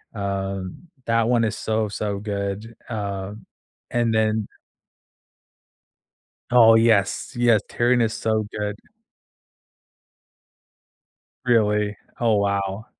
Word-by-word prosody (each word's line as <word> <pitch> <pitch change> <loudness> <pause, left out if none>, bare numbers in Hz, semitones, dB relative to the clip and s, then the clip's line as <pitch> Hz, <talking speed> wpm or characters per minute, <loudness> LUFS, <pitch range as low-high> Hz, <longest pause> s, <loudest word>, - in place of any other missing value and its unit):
Um, 100 - -4 0.2
that 115 0 +2
one 120 -2 +3
is 110 -1 -1
so, 110 -1 -1
so 100 -1 -3
good, 100 +2 -4
uh, 100 -3 -4 0.6
and 120 -1 +1
then 110 -1 +1 2.0
Oh, 115 -2 +7
yes. 110 -3 +2
Yes, 120 -3 +4
Tyrion 120 0 +2
is 115 0 0
so 110 -2 -1
good. 105 -1 -2 2.7
Really? 105 -4 +2 0.2
Oh, 115 -3 +3
wow. 100 0 -1
110 Hz, 90 wpm, -23 LUFS, 100-115 Hz, 2.7 s, Oh